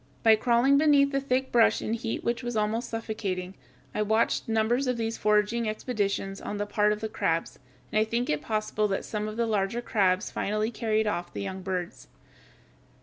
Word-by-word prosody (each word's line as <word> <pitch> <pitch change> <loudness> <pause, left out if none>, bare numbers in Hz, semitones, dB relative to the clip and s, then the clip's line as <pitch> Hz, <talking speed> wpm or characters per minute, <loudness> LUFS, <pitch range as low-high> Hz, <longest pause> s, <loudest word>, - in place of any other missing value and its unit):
By 225 -1 +7
crawling 245 +5 +3
beneath 285 -2 +4
the 275 0 0
thick 265 -1 -1
brush 235 -2 +4
in 220 - -3
heat 230 0 -3
which 235 +1 -1
was 240 -2 -3
almost 220 +3 -1
suffocating, 200 -5 -4 0.4
I 210 - -1
watched 220 +2 +1
numbers 225 +4 +1
of 250 -1 0
these 225 0 -2
foraging 210 +2 +1
expeditions 200 -3 -2
on 205 - -4
the 205 - -1
part 210 0 +2
of 210 0 -2
the 220 - -2
crabs, 165 -6 -2 0.3
and 215 - +2
I - - +4
think 235 +3 -1
it 150 -1 0
possible 215 +1 -1
that 195 -1 -2
some 210 -1 -3
of 215 +1 -6
the 235 - +1
larger 210 0 0
crabs 195 -5 +1
finally 215 +2 -1
carried 220 -2 0
off 175 -4 -2
the - - -5
young 190 -1 -5
birds. 180 -2 -4
215 Hz, 195 wpm, -27 LUFS, 205-235 Hz, 0.4 s, By